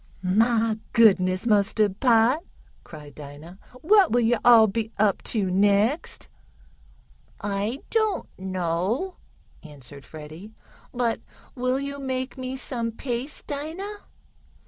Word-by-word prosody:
"Mah 225 +3 +2 0.2
goodness 190 -3 +4
mustard 205 -2 +2
pot!" 245 +4 +3 0.4
cried 150 -3 -12
Dinah. 150 +6 -11 0.2
"What 395 +2 +5
will 240 +1 +3
yo' 230 0 +2
all 235 -2 +8
be 220 +2 -3
up 205 -2 +2
to 200 -5 0
next?" 205 - +1 1.1
"I 205 +6 -3
don't 435 -4 0
know," 185 - -2 0.4
answered 140 -2 -12
Freddie. 155 +7 -11 0.4
"But 240 -2 -1 0.3
will 255 +1 -1
you 280 0 -5
make 260 -1 -3
me 260 0 -5
some 235 -3 -3
paste, 245 +4 -5
Dinah? 325 +9 -5
225 Hz, 110 wpm, -25 LUFS, 190-260 Hz, 1.1 s, all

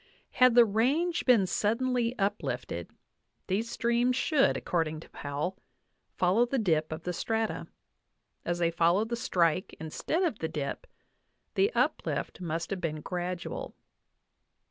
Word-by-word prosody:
Had 255 -2 +5
the 240 -1 +8
range 280 - +1
been 235 -6 +6
suddenly 240 +5 0
uplifted, 205 0 -2 0.6
these 210 +5 -1
streams 235 +2 +1
should, 280 +1 +3
according 160 -3 -1
to - - -14
Powell, 145 +7 -4 0.6
follow 195 +7 +3
the 270 - -1
dip 160 -9 +1
of 155 +1 -5
the 180 - -2
strata; 225 +4 -2 0.8
as 175 - -1
they 170 -1 +1
follow 170 +5 +3
the 235 +1 -2
strike 180 -7 +1
instead 160 - -2
of 310 - 0
the 160 - -2
dip, 140 -2 -4 0.7
the 400 +3 +3
uplift - - -1
must 165 0 -3
have 190 -2 -2
been 155 -2 -2
gradual. 180 +1 -4
195 Hz, 135 wpm, -29 LUFS, 170-240 Hz, 0.8 s, the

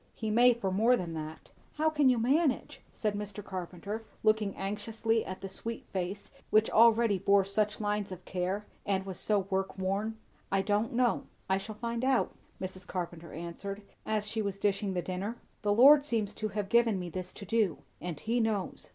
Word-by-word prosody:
"He 220 -2 -2
may 240 +2 +6
for 195 -5 -2
more 225 +6 +4
than 170 -5 -4
that." 155 0 -7 0.2
"How 315 +1 +2
can 295 -3 +4
you 250 - +4
manage?" 270 +5 +1
said 215 -2 -1
Mr. 205 0 -5
Carpenter, 190 +4 -5 0.2
looking 215 -2 +2
anxiously 220 +3 -1
at 185 - -7
the 195 - -4
sweet 230 +4 -5
face 190 +1 -3 0.2
which 215 +1 +4
already 230 -2 +5
bore 200 +1 +4
such 210 +1 0
lines 205 -2 -1
of 185 -1 -8
care, 190 +3 -2 0.2
and 190 -1 0
was 190 -3 -5
so 210 -2 +2
work 190 0 -1
worn. 200 +4 -1 0.3
"I 195 0 +2
don't 210 +3 +1
know. 240 0 +2 0.2
I 190 0 +2
shall 215 +2 -7
find 235 +2 -3
out," 260 -1 +2 0.3
Mrs. 185 -1 -6
Carpenter 170 -3 -5
answered 190 +5 -6 0.2
as 215 -1 -1
she 220 +1 -2
was 200 -2 -2
dishing 200 -1 0
the 175 - -1
dinner. 195 +6 -3 0.2
"The 205 -2 +1
Lord 280 +7 +8
seems 225 -7 0
to 215 - -3
have 205 -1 -3
given 235 -3 +4
me 175 -1 -5
this 185 +1 -3
to 200 - -9
do; 210 -5 +1 0.2
and 170 -4 -4
he 230 +6 0
knows. 220 -4 -1
205 Hz, 190 wpm, -31 LUFS, 190-225 Hz, 0.3 s, Lord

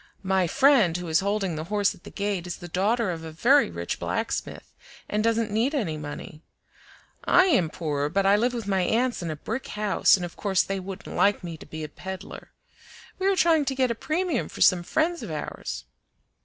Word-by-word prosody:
"My 190 -1 +2
friend 240 - +4
who 180 -1 -6
is 160 0 +3
holding 195 -3 -1
the 155 +1 -4
horse 205 +2 +1
at 190 - -19
the - - -8
gate 200 -3 -3
is 175 - -5
the 175 - -9
daughter 200 +4 +1
of 165 -1 -6
a 160 - -7
very 245 - +4
rich 85 0 -4
blacksmith, - - -3 0.3
and 210 +1 -1
doesn't 230 -1 +1
need 235 +8 +1
any 195 - -1
money. 150 +1 -8 0.8
I 360 +2 +6
am 190 - +3
poor, 150 -4 -2
but 195 +4 +1
I 200 +1 +6
live 240 +4 +2
with 230 -3 -4
my 195 -2 +1
aunts 240 +6 +1
in 170 - -3
a 155 - -3
brick 225 - -5
house, 210 -1 +3
and 180 -2 -3
of 175 - -9
course 195 -3 +1
they 195 0 -3
wouldn't 190 +1 -8
like 200 -1 +2
me 170 -2 -5
to 155 - -13
be 155 0 -6
a - - -4
peddler. 190 +5 -8 0.7
We 380 - +1
are 395 - +3
trying 330 -4 +3
to 270 - -1
get 260 -2 +2
a - - +1
premium 340 +9 -1
for - - -9
some 180 -2 +6
friends 320 - 0
of 225 - -6
ours." 150 - -5
195 Hz, 215 wpm, -26 LUFS, 170-235 Hz, 0.8 s, I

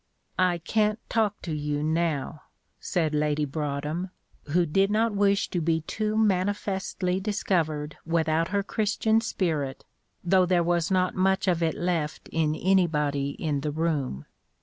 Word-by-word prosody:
"I 180 -1 +3
can't 210 +5 +1
talk 215 -3 0
to 165 - -3
you 145 0 -2
now," 155 -2 -1 0.4
said 160 -4 -1
Lady 150 0 +1
Broadhem, 150 +4 -3 0.4
who 170 +4 +2
did 195 +5 +2
not 220 +1 +2
wish 200 0 +2
to 175 - -1
be 160 0 +1
too 215 +6 -2
manifestly 190 -2 0
discovered 165 -7 -1
without 165 0 +1
her 200 +1 0
Christian 220 +2 +1
spirit, 155 -11 -2 0.4
though 185 0 +4
there 175 -1 +3
was 170 -1 +1
not 185 -1 +2
much 190 +1 +1
of 175 -2 +2
it 160 -2 +1
left 170 -4 -2
in 155 -1 +1
anybody 150 -7 +1
in 145 -3 -1
the 150 - -2
room. 145 - -2
170 Hz, 145 wpm, -26 LUFS, 150-195 Hz, 0.4 s, though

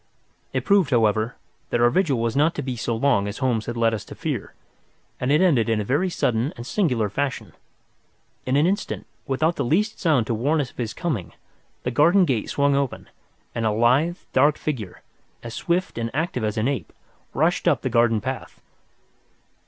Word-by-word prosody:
It - - -2
proved, 200 -6 +4
however, 110 -2 +2 0.3
that 120 - 0
our 120 0 +4
vigil 160 -5 +2
was 115 0 -1
not 150 +4 +3
to - - -3
be 130 -1 -3
so 115 0 -2
long 115 -4 +2
as 100 - -5
Holmes 120 -5 0
had 120 0 -4
led 115 -1 +2
us 110 - -3
to - - -10
fear, - - -4 0.6
and 125 +2 0
it 150 - +4
ended 135 -12 +3
in 110 -1 +2
a - - -1
very 145 - +1
sudden 125 -4 0
and 120 - -7
singular 125 - +1
fashion. 110 - -3 0.9
In 130 - +1
an 145 +3 +4
instant, 200 +4 -1 0.2
without 155 +6 +1
the - - 0
least 205 - 0
sound 150 - +2
to 115 - -1
warn 140 +8 +1
us 135 -4 -2
of - - -32
his 115 -4 -3
coming, 140 - -3 0.5
the 125 - -1
garden 170 +9 +5
gate 125 -9 -1
swung 140 0 +2
open, 140 -2 -2 0.4
and 115 - -2
a 110 - +2
lithe, 125 +11 +2 0.2
dark 145 +3 +4
figure, 115 -12 -5 0.4
as 115 - -7
swift 175 -3 -1
and 115 0 -2
active 155 -6 -1
as 105 0 -1
an 110 +3 +1
ape, 140 -2 -3 0.4
rushed 160 +6 +1
up - - +2
the - - 0
garden 115 -3 +2
path. 130 +2 -5
130 Hz, 195 wpm, -23 LUFS, 115-155 Hz, 0.9 s, garden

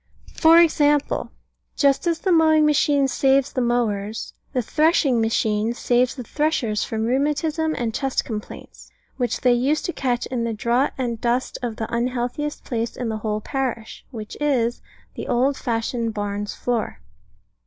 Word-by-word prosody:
For 325 0 +6
example: 295 -3 +2 0.4
just 280 +3 +2
as 335 -1 +1
the 375 +3 -1
mowing 315 -2 +5
machine 290 -2 +3
saves 270 +1 +2
the 255 - 0
mowers, 220 -3 -1 0.2
the 255 -3 -1
threshing 295 -3 +2
machine 220 0 +1
saves 245 +1 +1
the 255 - -6
threshers 240 -6 0
from 220 0 -2
rheumatism 300 +5 0
and 230 -2 -2
chest 270 +2 -1
complaints, 215 -3 -8 0.3
which 245 -3 -1
they 250 -1 +4
used 265 +6 +1
to 345 - -2
catch 245 -3 -1
in 245 -2 -3
the 230 -1 -2
draught 235 +5 +1
and 235 -4 -3
dust 245 +2 -1
of 240 -3 -3
the 220 - -3
unhealthiest 250 +5 -2
place 230 -1 -3
in 245 -2 -3
the 220 - -2
whole 215 0 -2
parish, 245 -3 -4
which 220 -5 -8
is, 245 -5 +1 0.3
the - - -6
old 260 +4 +2
fashioned 230 -2 -2
barn's 205 0 -3
floor. 230 - -2
245 Hz, 155 wpm, -22 LUFS, 230-285 Hz, 0.4 s, For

